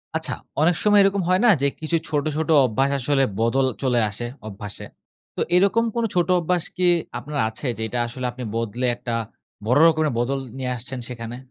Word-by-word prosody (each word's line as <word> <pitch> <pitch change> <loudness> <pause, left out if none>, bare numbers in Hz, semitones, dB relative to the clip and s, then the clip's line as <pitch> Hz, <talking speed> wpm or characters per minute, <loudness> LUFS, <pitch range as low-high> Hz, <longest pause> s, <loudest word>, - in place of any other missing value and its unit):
আচ্ছা, - - -1 0.3
অনেক 175 +2 +4
সময় 210 -1 +5
এরকম 195 0 +2
হয় 185 +3 +3
না - - +7
যে, 140 - +3
কিছু 160 +1 0
ছোট, 150 -2 0
ছোট 160 0 -2 0.2
অভ্যাস 135 +4 +1
আসলে 135 +1 +2 0.2
বদল 130 +4 +2 0.2
চলে 125 -2 +2
আসে, 105 +4 -6 0.2
অভ্যাসে? 105 0 -7 0.5
তো - - -3
এরকম 200 +5 +4
কোনো 235 -1 +1
ছোট 175 -1 +2
অভ্যাস 175 0 0
কি 180 0 +2 0.3
আপনার 145 +3 -6
আছে? 115 +5 -6
যেটা 110 +2 -3
আসলে 125 +2 -6
আপনি 125 +1 -8
বদলে 115 +2 -2
একটা 120 0 -5 0.5
বড় 125 +6 +3
রকমের 155 -3 +2
বদল 135 +3 0 0.2
নিয়ে 130 -1 -2
আসছেন 130 +2 -6
সেখানে? 115 -1 -6
135 Hz, 185 wpm, -23 LUFS, 120-165 Hz, 0.5 s, না